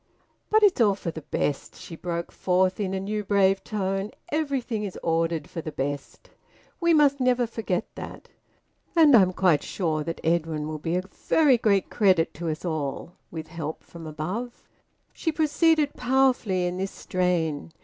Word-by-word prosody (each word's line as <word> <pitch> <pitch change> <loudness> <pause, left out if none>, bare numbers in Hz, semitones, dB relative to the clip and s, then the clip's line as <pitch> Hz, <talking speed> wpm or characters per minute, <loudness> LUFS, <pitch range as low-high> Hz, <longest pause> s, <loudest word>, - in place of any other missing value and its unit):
"But 435 0 +4
it's 380 -10 +5
all 205 -3 +4
for 175 -4 -4
the 160 - -8
best!" 145 -1 -2
she 165 - -9
broke 170 0 -4
forth 185 +1 +1
in 195 -2 -1
a - - -1
new 210 +2 -3
brave 195 -1 +2
tone. 195 -1 -2 0.2
"Everything 275 -8 -1
is 195 -3 -5
ordered 165 -1 0
for 165 - -6
the 155 - -6
best. 145 0 -5 0.5
We 340 -1 +3
must 290 -3 +4
never 250 -1 +2
forget 220 -5 -2
that! - - -9 0.7
And 310 -5 +7
I'm 190 -5 +6
quite 180 -5 +3
sure 160 -5 -2
that 165 +2 -5
Edwin 160 -2 0
will 155 0 -5
be 165 +3 -2
a 180 - 0
very 260 +7 +2
great 200 -5 +2
credit 185 -7 +3
to 170 +1 -4
us 155 +3 -4
all, 155 -1 -3 0.2
with 160 -1 -7
help 160 -2 -6
from 165 -2 -10
above." 185 +11 -5 0.5
She 320 - -1
proceeded 310 -1 +2
powerfully 245 -8 +2
in 180 0 -2
this 195 +1 -1
strain. 170 -6 -1
185 Hz, 170 wpm, -26 LUFS, 165-240 Hz, 0.7 s, And